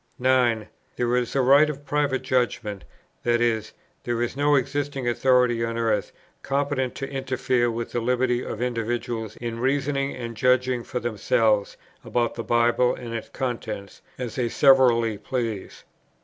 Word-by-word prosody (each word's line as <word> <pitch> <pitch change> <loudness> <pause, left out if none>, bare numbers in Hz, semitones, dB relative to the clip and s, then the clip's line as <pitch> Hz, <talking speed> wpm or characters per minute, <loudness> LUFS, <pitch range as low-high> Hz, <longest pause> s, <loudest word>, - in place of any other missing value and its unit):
9. 125 -4 +2 0.3
There 120 0 0
is 125 0 -1
a 135 - +3
right 140 +4 +6
of 145 -1 -6
Private 145 -3 0
Judgment: 115 -5 -1 0.4
that 120 0 +2
is, 110 -2 0 0.3
there 120 -1 -2
is 120 +1 -1
no 145 +1 +3
existing 140 -1 -1
authority 125 -1 +3
on 115 0 -2
earth 110 -3 0 0.3
competent 140 -2 -1
to 135 - -4
interfere 130 -2 0
with 115 0 -4
the 120 - -1
liberty 125 +1 +1
of 110 - -4
individuals 115 -2 -3
in 115 -1 -5
reasoning 140 +2 0
and 115 -2 -6
judging 125 +1 +2
for 125 - -4
themselves 110 -2 +1 0.3
about 120 -1 0
the 115 - -5
Bible 120 +1 +2
and 120 -2 -7
its 115 - -5
contents, 115 -6 -5 0.2
as 125 -3 -4
they 120 -2 0
severally 120 -6 +4
please. 115 -4 -4
120 Hz, 150 wpm, -24 LUFS, 115-130 Hz, 0.4 s, right